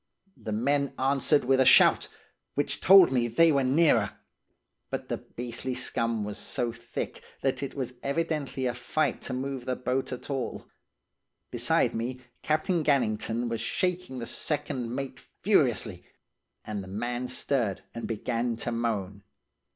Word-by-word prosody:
The 110 - -7
men 140 +6 0
answered 135 +1 +2
with 135 +1 +3
a - - +7
shout, - - +6 0.5
which 145 - -1
told 190 -4 +8
me 120 -2 +2
they 160 +8 +5
were 140 -2 +2
nearer, 130 - +3 0.7
but - - -5
the - - -1
beastly 120 +1 -5
scum 115 -3 -1
was 105 0 -5
so 120 -1 -2
thick 120 +1 -6 0.2
that 135 0 0
it 140 - -5
was 130 -3 -3
evidently 140 -3 -1
a 125 - 0
fight 130 +3 -1
to 125 - -3
move 130 0 -4
the 130 - -1
boat 130 +2 -2
at 125 +3 -6
all. 135 -3 -4 0.8
Beside - - +2
me, 125 +3 -3 0.2
Captain 155 +2 +1
Gannington 120 -4 +1
was 115 -1 -2
shaking 180 +2 -1
the 120 - -4
second 130 -4 -1
mate 135 -1 -5 0.2
furiously, - - +2 0.6
and 105 -2 -4
the - - -10
man 120 +5 -3
stirred 125 -5 -1
and 115 - -5
began 115 +1 -1
to 120 +1 -3
moan. 105 -4 -2
125 Hz, 150 wpm, -28 LUFS, 115-140 Hz, 0.8 s, told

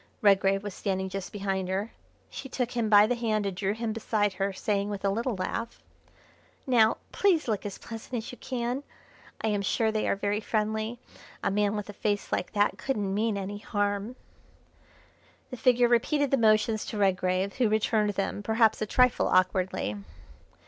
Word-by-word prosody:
Redgrave 195 -1 +4
was 205 -2 -5
standing 190 -1 -2
just 190 -1 -5
behind 195 -2 -2
her; 195 +4 -2 0.4
she 270 - -8
took 250 -1 -2
him 235 -3 -1
by 205 0 +8
the 240 - +1
hand 220 -3 -1
and 195 -2 -2
drew 195 +2 -1
him 225 -1 -2
beside 210 -2 0
her, 195 +1 -1
saying, 200 +1 -1
with 200 -1 -4
a 195 - +3
little 230 +3 -1
laugh: 230 +5 -4 0.8
"Now, 230 -4 +4
please 365 -8 +2
look 210 -3 -1
as 200 - -7
pleasant 225 +2 -8
as 225 -2 -4
you 250 - -12
can; 250 +1 -3 0.6
I 220 - 0
am 205 -1 0
sure 220 +3 +1
they 215 0 -1
are - - +2
very 205 +1 -1
friendly. 220 +1 -1 0.5
A - - +1
man 205 +1 +1
with 210 -1 -4
a 205 - -8
face 205 0 -2
like - - -2
that 205 0 +1
couldn't 205 -8 -1
mean 215 0 0
any 200 +1 -5
harm." 205 +2 -2 1.4
The 255 - -5
figure 245 0 +4
repeated 275 +4 +2
the - - +5
motions 215 -2 +3
to 220 - -5
Redgrave, 185 -1 +1
who 245 -4 +3
returned 215 0 +2
them, 200 +1 -2
perhaps 220 +1 +2
a 215 - -1
trifle 250 +2 +3
awkwardly. 185 - +1
210 Hz, 180 wpm, -28 LUFS, 200-230 Hz, 1.4 s, by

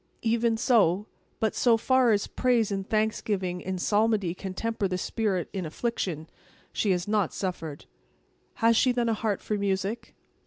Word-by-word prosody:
"Even 230 0 +2
so. 210 -5 +3 0.3
But 220 -2 +1
so 235 -2 +3
far 255 +1 +3
as 205 -1 +2
praise 240 -4 +1
and 195 -1 -3
thanksgiving 205 -4 -1
in 190 0 -3
psalmody 205 -1 +1
can 185 0 -7
temper 225 -1 -1
the 185 -1 -2
spirit 195 -2 -1
in 190 -2 -3
affliction, 165 -2 -3 0.5
she 210 - 0
has 180 -1 +1
not 210 -4 0
suffered." 165 -6 -4 0.7
"Has 230 0 +3
she 255 +3 +4
then 240 -1 0
a - - +2
heart 215 -2 -1
for 210 -1 -2
music?" 200 +2 -2
210 Hz, 160 wpm, -27 LUFS, 185-225 Hz, 0.7 s, she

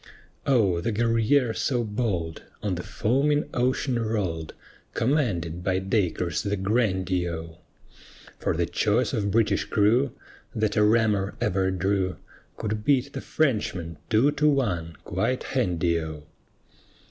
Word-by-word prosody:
O, 100 -11 +3
the 115 - -1
Guerrière 115 +3 +2
so 125 -3 0
bold 105 -7 -2 0.2
On 105 -3 0
the 90 - -3
foaming 140 - +1
ocean 125 0 +1
rolled, 95 -8 -2 0.4
Commanded 100 - 0
by 95 0 +1
Dacres 95 -4 0
the 100 0 -1
grandee 95 -4 0
O; 80 -1 -7 0.8
For - - -1
the - - +2
choice - - +1
of 100 -1 0
British 110 +1 +2
crew 115 +6 +3 0.4
That 110 -1 0
a 105 - +4
rammer 105 -2 +2
ever 95 -5 +1
drew 95 0 0 0.4
Could 105 0 -3
beat 140 +2 +2
the - - -4
Frenchmen 100 - -1
two 120 +6 +4
to 150 +1 +2
one 90 - 0
quite 130 0 -1
handy 85 -9 0
O. 80 -1 -7
105 Hz, 130 wpm, -26 LUFS, 90-120 Hz, 0.8 s, a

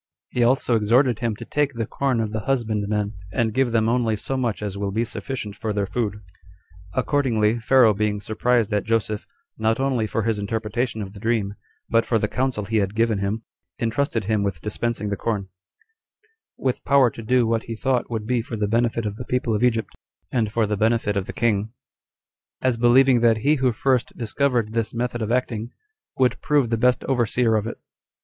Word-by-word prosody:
He 125 - 0
also 125 0 +3
exhorted 120 +3 +3
him 115 -3 -1
to - - -9
take 145 -1 0
the 115 -2 -2
corn 135 +1 -1
of 110 -1 -2
the 110 - -2
husbandmen, 105 -5 0 0.2
and 110 +2 0
give 130 0 +2
them 110 -1 +2
only 115 -2 +1
so 135 +6 -3
much 120 -5 -1
as 100 -2 -3
will 100 0 -2
be 110 +4 0
sufficient 110 -3 -5
for 110 0 -3
their 100 -1 0
food. 105 0 -3 0.7
Accordingly 120 -6 +1
Pharaoh 115 -1 +5
being 105 0 -1
surprised 110 +1 +1
at 105 - +1
Joseph, 110 -1 -1 0.3
not 110 +2 +1
only 130 -5 +1
for 115 - -1
his 110 -1 0
interpretation 110 +2 -2
of 95 0 -9
the 100 - -10
dream, 110 -2 0 0.3
but 115 0 +3
for 115 - +1
the 105 - 0
counsel 125 -3 -1
he 110 +2 0
had 100 -1 0
given 115 -2 +2
him, 100 +3 -2 0.3
intrusted 115 0 0
him 105 +1 0
with 100 -5 -2
dispensing 105 0 -2
the 100 - -1
corn; 100 -2 -2 1.1
with 130 -2 -1
power 135 -3 +4
to 115 - -9
do 125 +2 +2
what 115 0 0
he 115 - -5
thought 130 +1 0
would 110 -2 -3
be 120 +1 +1
for 115 - -6
the 105 -1 -1
benefit 115 +1 +1
of 105 0 -3
the 125 - -6
people 125 -2 0
of 105 - 0
Egypt, 115 -2 +1 0.4
and 110 -5 0
for 110 0 +1
the 105 0 -1
benefit 110 0 +1
of 100 -1 -1
the - - -4
king, 110 -1 0 0.9
as 130 -2 +1
believing 120 +2 +5
that 115 -1 +4
he 150 - +5
who 130 -1 +2
first 125 +1 0
discovered 120 -1 0
this 115 0 -1
method 120 0 -2
of 110 +1 -2
acting, 120 -2 -1 0.5
would 130 -1 +2
prove 140 -6 +2
the - - +3
best 125 +2 +2
overseer 120 -2 +1
of 110 0 0
it. 115 - -5
115 Hz, 200 wpm, -23 LUFS, 105-125 Hz, 1.1 s, Pharaoh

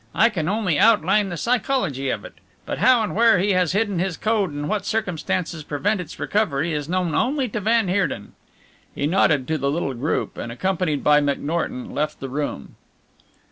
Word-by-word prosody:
I 230 - +5
can 175 -7 -2
only 190 -7 0
outline 205 -2 +4
the 175 - -5
psychology 215 - 0
of - - -3
it, - - -10 0.3
but - - -4
how 255 -3 +5
and 210 - -3
where 225 -2 +5
he 200 +3 +1
has 185 -2 +2
hidden 205 -3 0
his 185 -1 -1
code 215 -3 +1
and 145 0 -4
what 210 -2 -1
circumstances 180 -6 -2
prevent 185 +8 -1
its 165 -2 -10
recovery, 170 -7 0
is 150 0 -3
known 180 -3 0
only 270 0 +1
to 210 - -3
van 220 +1 +2
Heerden." 180 - -1 0.6
He 140 - -1
nodded 150 -5 +2
to 160 -1 0
the 140 +1 0
little 145 -2 -1
group, 130 +6 -2
and 120 - -5
accompanied 170 +1 -1
by 150 0 +5
McNorton 170 - -2
left 150 +1 -2
the 135 - -6
room. 140 - -4
180 Hz, 185 wpm, -22 LUFS, 150-215 Hz, 0.6 s, I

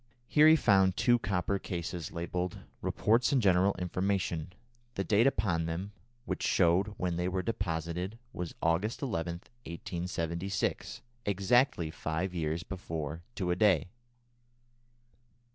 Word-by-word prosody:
Here 150 +4 +6
he 160 - +8
found 95 - +4
two 120 -1 +4
copper 100 -1 -1
cases 85 -2 -4
labelled 90 +1 -3 0.2
"Reports 115 +3 +2
and 140 - +4
General 95 -2 +4
Information." 90 -2 -1 0.4
The 95 - -1
date 105 +6 +4
upon 95 -10 +1
them, 90 +5 -4 0.3
which - - -3
showed 95 +5 +2
when 90 -2 -1
they 90 +1 0
were 95 0 -1
deposited, 90 -2 -3 0.2
was 90 -2 -5
August 90 - +1
11, 85 -8 -2 0.3
1876, 85 +2 -3 0.3
exactly 100 - +2
five 80 +4 -3
years 80 -1 -2
before 80 -4 -5
to 90 -4 -1
a - - +2
day. 90 -5 +3
90 Hz, 125 wpm, -31 LUFS, 85-100 Hz, 0.4 s, he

